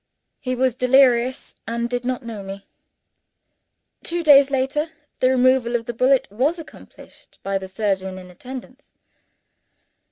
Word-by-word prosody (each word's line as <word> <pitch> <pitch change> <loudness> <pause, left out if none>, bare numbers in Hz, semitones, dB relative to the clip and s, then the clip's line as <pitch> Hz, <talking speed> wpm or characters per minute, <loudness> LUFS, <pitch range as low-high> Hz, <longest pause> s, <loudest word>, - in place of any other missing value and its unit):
He 255 -2 -3
was 255 0 +1
delirious 255 0 +3
and 235 +1 -2
did 245 0 -3
not 250 0 -3
know 225 -3 -6
me. 195 0 -9 1.4
Two 345 0 -2
days 280 -3 +7
later, 275 +3 0 0.3
the 255 - +3
removal 255 -2 +3
of 230 -1 -1
the 240 - -4
bullet 255 +3 +2
was 270 +11 0
accomplished 325 - -14
by 195 0 -1
the 190 - -8
surgeon 190 -1 -2
in 180 -1 -11
attendance. 255 +7 -11
250 Hz, 135 wpm, -22 LUFS, 225-265 Hz, 1.4 s, days